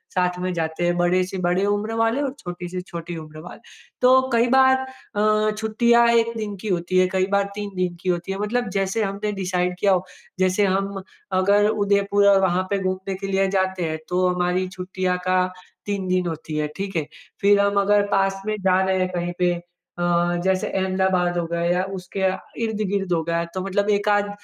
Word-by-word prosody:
साथ 180 -1 +1
में 185 0 -2
जाते 165 0 -2
हैं, 175 0 +1
बड़े 175 +1 +2
से 190 - -4
बड़े 185 +3 +1
उम्र 205 +2 -1
वाले 225 +5 +1
और 270 -2 -2
छोटी 175 0 -6
से 180 0 -4
छोटी 170 -1 -7
उम्र 155 0 -12
वाले। - - -11 0.4
तो 260 +1 +5
कई 235 +1 +4
बार 260 0 +6 0.4
अ, 215 +1 +2
छुट्टियाँ 235 +2 +3
1 230 0 +3
दिन 210 -2 -4
की - - -6
होती 180 0 0
है, 185 - +4
कई 185 0 +2
बार 200 0 +1
3 205 -1 -5
दिन 180 -1 -1
की 185 - -2
होती 175 +2 -1
हैं, 195 - -6
मतलब 225 +2 -1
जैसे 195 +3 0
हमने 200 +1 -2
डिसाइड 180 -1 -1
किया 200 0 +3
हो। 185 0 0 0.3
जैसे 185 +2 +3
हम 195 +1 -1 0.4
अगर 205 +2 +4
उदयपुर 200 -1 +2
और 195 -1 +5
वहाँ 185 -1 +2
पे 200 - +1
घूमने 190 0 -3
के 195 +1 -6
लिए 195 0 +1
जाते 190 -2 0
हैं, 155 0 -3
तो 180 0 +2
हमारी 180 +1 0
छुट्टियाँ 185 0 -2
का 185 0 +3 0.4
3 200 -2 -2
दिन 180 -1 +1
होती 160 -1 -5
हैं, 150 0 -1
ठीक 195 -1 -4
है। 155 -3 -1 0.3
फिर 200 0 +5
हम 200 0 +2
अगर 205 0 +3
पास 195 0 +1
में 215 - 0
जा 185 0 +3
रहे 190 0 +1
हैं 185 0 0
कहीं 175 0 -2
पे 180 -1 +3 0.5
अ, - - -2 0.4
जैसे 190 -1 +1
अहमदाबाद 185 -2 0
हो 170 - 0
गया 170 0 -2
या 175 +2 +1
उसके 185 +1 -6
आ 185 - -1 0.2
इर्द-गिर्द 205 -4 -1
हो 165 - +1
गया, 170 +1 -1
तो 170 +2 -6
मतलब 200 +2 0
1 205 0 +1
आध 205 0 +2
190 Hz, 210 wpm, -22 LUFS, 180-205 Hz, 0.5 s, बार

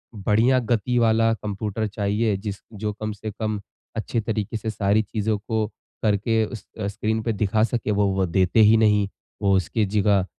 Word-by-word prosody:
बढ़िया 110 +6 +3
गति 120 0 0
वाला 115 0 +3
कंप्यूटर 105 0 -3
चाहिए 105 +1 0
जिस 100 0 -5
जो 105 0 -3
कम 110 0 -4
से 105 +1 -6
कम 110 0 -3 0.4
अच्छे 115 +1 -1
तरीके 110 0 -2
से 110 +1 -4
सारी 105 0 +2
चीज़ों 110 0 -1
को 110 -2 0 0.4
करके 110 +1 +2
उस 110 -2 -8 0.2
स्क्रीन 110 +2 -1
पे 115 - 0
दिखा 105 +1 +1
सके 115 -2 0
वो, 100 0 +2
वो 95 -1 +1
देते 95 +4 +2
ही 110 +1 +7
नहीं। 105 -2 +3 0.3
वो 100 -1 +3
उसकी 95 +4 +1
जगह 100 -1 +2
105 Hz, 175 wpm, -24 LUFS, 100-110 Hz, 0.4 s, ही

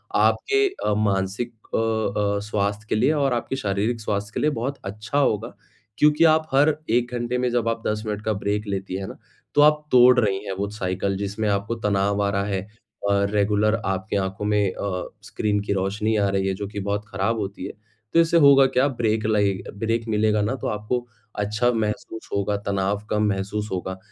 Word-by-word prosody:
आपके 410 -1 +3 0.2
अ, 105 - +2
मानसिक 100 +3 -1 0.2
अ 110 -2 0
अ, - - -1
स्वास्थ्य 100 +1 -1
के - - +1
लिए 130 +7 +3
और 140 -4 +1
आपके 120 +2 -2
शारीरिक 110 0 -1
स्वास्थ्य 105 -1 -2
के - - 0
लिए 150 - +3
बहुत 135 +2 -3
अच्छा 110 +7 -4
होगा, 110 -7 +1 0.4
क्योंकि 150 +2 +4
आप 160 0 -2
हर 145 +3 +4
1 120 +2 +1
घंटे 120 +1 -1
में 125 0 +1
जब 120 -1 +1
आप 115 0 -3
10 105 0 -1
मिनट 105 0 -3
का 110 - +1
ब्रेक 105 +1 -2
लेती 95 -1 -3
हैं 95 - -5
ना, - - -9 0.4
तो 145 - +6
आप 150 0 +5
तोड़ 125 0 +7
रही 100 -3 0
हैं 100 - -4
वो 100 +1 -1
साइकिल 95 -1 -2
जिसमें 100 +2 -2
आपको 100 +3 -1
तनाव 100 0 +1
आ 100 - +1
रहा 100 0 0
है, 100 -1 -3 0.4
और 100 0 +2
रेगुलर 105 +1 +2
आपके 95 +1 -1
आँखों 95 +1 -2
में 105 -2 +2
अ, 95 -2 -4 0.2
स्क्रीन 105 -1 -1
की - - +1
रोशनी 100 +3 0
आ 100 - +2
रही 95 0 0
है, 95 - 0
जो 100 0 -5
कि 105 0 -6
बहुत 100 +1 -2
खराब 110 +4 -1
होती 100 -1 -5
है। - - -5 0.4
तो 165 - +5
इससे 165 +1 +3
होगा 140 -3 +7
क्या? 130 +2 +2
ब्रेक 110 -4 -1
लएग 100 -3 +1 0.2
ब्रेक 115 +1 -1
मिलेगा 105 0 +2
ना, 115 +6 -1
तो - - -5
आपको 120 +4 -2 0.3
अच्छा 110 +4 +1
महसूस 110 0 -3
होगा, 100 0 0
तनाव 100 0 -1
कम 105 0 +1
महसूस 100 +2 -2
होगा। 95 0 -3
105 Hz, 200 wpm, -23 LUFS, 100-120 Hz, 0.4 s, तोड़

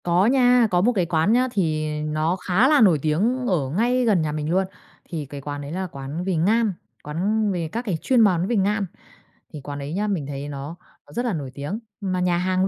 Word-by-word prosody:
Có 175 +2 +3
nha, 250 -1 +5
có 175 -1 +3
một 235 +6 +3
cái 185 -6 +1
quán 165 +5 +2
nhá 250 +2 +3
thì 155 -7 0
nó 155 +3 0
khá 190 +6 +2
là 295 -2 +5
nổi 180 -8 +5
tiếng 215 - +1
ở 155 - 0
ngay 240 - +1
gần 205 -7 +3
nhà 155 -1 -1
mình 150 0 -3
luôn. 185 +3 +2 0.5
Thì 160 -4 -4
cái 140 +1 -8
quán 145 +1 -5
đấy 140 +1 -7
là 185 +2 -3
quán 140 +2 -6
về 190 -1 -1
ngan, 210 +6 +2 0.3
quán 200 +8 0
về 170 -4 -2
các 235 - -2
cái 190 -7 -1
chuyên 255 -3 +3
món 185 -4 +3
về 240 - 0
ngan. 205 +1 +1 0.7
Thì 150 - -7
quán 145 +1 -6
đấy 140 +2 -5
nhá, 205 +4 -1
mình 175 -9 -2
thấy 140 0 -5
nó 140 +3 -6 0.3
nó - - -15
rất 240 +1 -2
là 235 - 0
nổi 140 -6 -4
tiếng, 145 +10 -4 0.2
mà 185 -2 -1
nhà 180 -1 +1
hàng, 185 +1 +1
180 Hz, 235 wpm, -23 LUFS, 155-210 Hz, 0.7 s, nha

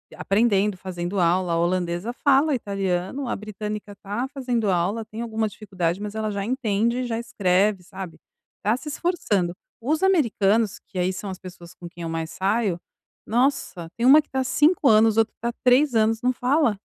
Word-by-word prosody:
aprendendo, 205 -1 +1
fazendo 180 +1 -4
aula. 175 +1 +2
A - - +1
holandesa 175 +4 -1
fala 285 +3 +3
italiano, 195 +2 -2
a - - -1
britânica 210 0 -6
tá 210 +6 -3
fazendo 245 -6 -1
aula, 190 +5 0
tem 220 +1 -7
alguma 220 -1 -1
dificuldade, 190 -4 -3
mas 210 0 -5
ela 220 0 -2
já 200 -1 -3
entende 235 -1 0
e - - -1
já 225 -1 -2
escreve, 205 -4 +1
sabe? 185 -2 -8 0.4
Tá 215 +3 +2
se 300 +3 -8
esforçando. 215 - -1 0.3
Os 310 +8 0
americanos 230 - +2
que, 190 - -6
aí, 180 +1 +1
são 195 +2 -6
as 185 - -8
pessoas 180 -2 -11
com 175 - -10
quem 170 0 -10
eu 165 - -3
mais 165 0 -3
saio, 195 -2 0 0.5
nossa, 235 -8 0
tem 235 - 0
uma 285 +4 +8
que 300 - -32
está 265 0 -1
5 295 +4 +3
anos, 220 -1 +5
outra 225 -1 +2
que - - -62
tá 235 +1 -2
3 255 +1 +4
anos. 220 0 +2
Não 255 +1 +2
fala 250 -3 +1
215 Hz, 185 wpm, -24 LUFS, 185-245 Hz, 0.5 s, uma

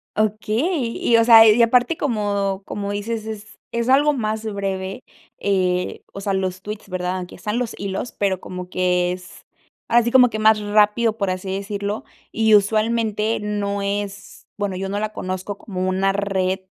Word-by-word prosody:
Okey, 230 - 0
y 230 - +3
o 230 - +5
sea, 225 -1 +9
y 220 +3 +5
aparte, 245 +6 +3
como 200 -7 -1
como 200 0 -4
dices: 215 +2 -3
"Es 215 -1 -8
es 235 +1 -1
algo 290 +3 +5
más 220 -3 -2
breve", 195 -2 -4 0.3
eh, 180 -2 0
o 195 - -8
sea, 195 0 -2
los 185 -1 -2
tweets, 210 -1 -7
¿verdad? 180 0 -2
Aunque 180 -1 -7
están 210 +6 -3
los 240 -3 -3
hilos, 200 +4 -4
pero 190 -2 0
como 180 0 -7
que 180 -1 +1
es, 180 0 -9 0.4
así 235 0 +3
como 250 -2 +6
que 215 - -3
más 215 0 +5
rápido, 210 +2 +2
por 200 -3 -1
así 185 +1 -3
decirlo, 200 +1 -4 0.3
y 220 -1 +4
usualmente 215 +1 +1
no 200 -1 -2
es 200 0 -5
bueno, 200 -2 -2
yo 195 +1 -4
no 205 +1 -2
la 215 0 -2
conozco 185 +2 -4
como 185 -3 -4
una 190 +1 +1
red 190 -1 -1
205 Hz, 170 wpm, -21 LUFS, 190-220 Hz, 0.4 s, sea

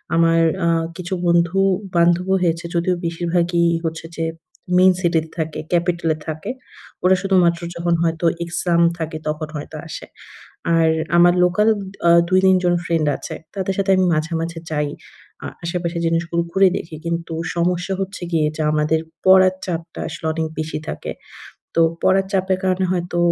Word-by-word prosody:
আমার 165 0 +4 0.3
আ - - +2 0.3
কিছু 180 +1 -5
বন্ধু-বান্ধবও 180 +1 +2
হয়েছে, 170 0 0
যদিও 175 +1 +1
বেশিরভাগই 170 0 0 0.2
হচ্ছে 160 0 -4
যে, 165 - -1 0.5
মেইন 185 0 +6
সিটিতে 165 -2 +1
থাকে, 160 -1 -3
ক্যাপিটালে 170 -2 +1
থাকে। 155 +9 -4 0.5
ওরা 185 +1 +5
শুধুমাত্র 180 -3 +3 0.2
যখন 170 0 0
হয়তো 165 +1 -1 0.2
এক্সাম 170 0 0 0.2
থাকে, 160 -1 -4
তখন 155 0 -2
হয়তো 150 +1 -7
আসে। - - -7 0.7
আর 165 -1 +4 0.3
আমার 175 0 +6
লোকাল 190 +5 +2 0.4
আ - - +7 0.2
২-৩ 185 0 +4
জন 175 0 +3
ফ্রেন্ড 165 -3 0
আছে। - - -7 0.2
তাদের 195 0 -1
সাথে 195 0 +1
আমি 185 - +3
মাঝে, 155 +2 -1
মাঝে 165 0 -4
যাই। 150 -1 0 0.5
আ - - -4 0.2
আশেপাশের 170 0 -2
জিনিসগুলো 165 +1 0
ঘুরে 195 0 +5
দেখি। 160 -3 -7
কিন্তু 170 0 -3 0.2
সমস্যা 175 +2 0
হচ্ছে 195 +1 -5
গিয়ে 155 -2 +2
যে, 160 - -3
আমাদের 155 +1 +1 0.3
পড়ার 185 0 +6
চাপটা 165 -2 -5
আসলে - - -8
অনেক 160 0 -1
বেশি 155 0 -3
থাকে। - - -5 0.6
তো 165 - +3 0.2
পড়ার 190 0 +3
চাপের 190 -1 +1
কারণে 185 0 +1
হয়তো 175 -1 -2
170 Hz, 150 wpm, -20 LUFS, 165-185 Hz, 0.7 s, আ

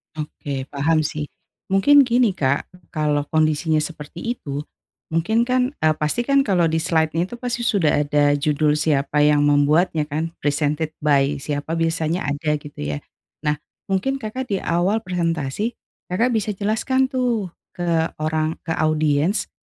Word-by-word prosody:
Oke 145 -3 -5
paham 155 +3 +2
sih, 150 0 -3 0.4
mungkin 270 +8 +5
gini, 240 -3 +3
Kak, 140 -5 -1 0.2
kalau 150 -1 -1
kondisinya 155 0 +2
seperti 155 +1 -8 0.2
itu, 140 0 -5 0.5
mungkin 195 +9 +2
kan, 255 +3 0
eee, 155 - +5
pastikan 240 - +1
kalau 180 -10 +2
di 160 - +1
slidenya 160 +1 +1
itu 240 - -8
pasti 240 -1 -3
sudah 170 -10 +2
ada 145 0 +3
judul 150 +1 +1
siapa 150 -2 +1
yang 150 0 +4
membuatnya 150 +2 +3
kan, 155 +3 -2
presented 150 +2 -1
by 140 -1 +3
siapa 145 +2 -3
biasanya 165 +1 0
ada 150 +1 0
gitu 145 - -5
ya. 75 - -8 0.4
Nah, 150 -1 0 0.3
mungkin 200 +8 +1
Kakak 255 +1 -5
di - - -4
awal 185 +6 +1
presentasi, 170 - -2 0.3
Kakak 230 +8 +1
bisa 215 -2 -1
jelaskan 260 +6 0
tuh 240 -8 0 0.2
ke 165 -2 +1
orang 155 +1 -1
ke 165 - -4
audiens 155 +3 +1
160 Hz, 145 wpm, -22 LUFS, 150-195 Hz, 0.5 s, mungkin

